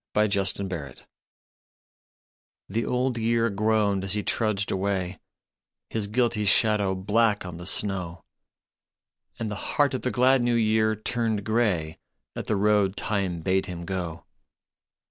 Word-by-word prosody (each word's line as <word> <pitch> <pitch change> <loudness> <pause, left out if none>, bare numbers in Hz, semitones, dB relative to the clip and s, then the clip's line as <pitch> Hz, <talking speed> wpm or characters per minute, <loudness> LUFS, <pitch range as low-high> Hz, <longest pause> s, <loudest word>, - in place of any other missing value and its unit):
BLOOD 105 -1 +3 0.4
ROAD 70 -7 -7 1.6
THE 115 +4 -2
Old 125 -1 0
Year 115 0 +1
groaned 105 -1 +1
as 95 0 +1
he 105 -1 -1
trudged 105 -2 0
away, 95 -2 -2 0.7
His 110 -2 -1
guilty 115 -1 +1
shadow 105 -2 +3
black 105 +2 +1
on 90 -2 -7
the 85 +1 -6
snow, 90 -4 -1 1.1
And 110 -2 -4
the 105 - -5
heart 145 -2 +3
of 130 - -2
the 125 - -1
glad 130 +1 +3
New 120 0 +1
Year 110 -1 +2
turned 110 -1 -1
grey 100 -9 0 0.4
At - - -5
the 110 - +1
road 105 -1 +2
Time 95 -5 -1
bade 95 +2 0
him 85 -2 -6
go. 85 -3 -4
105 Hz, 135 wpm, -26 LUFS, 95-115 Hz, 1.6 s, BLOOD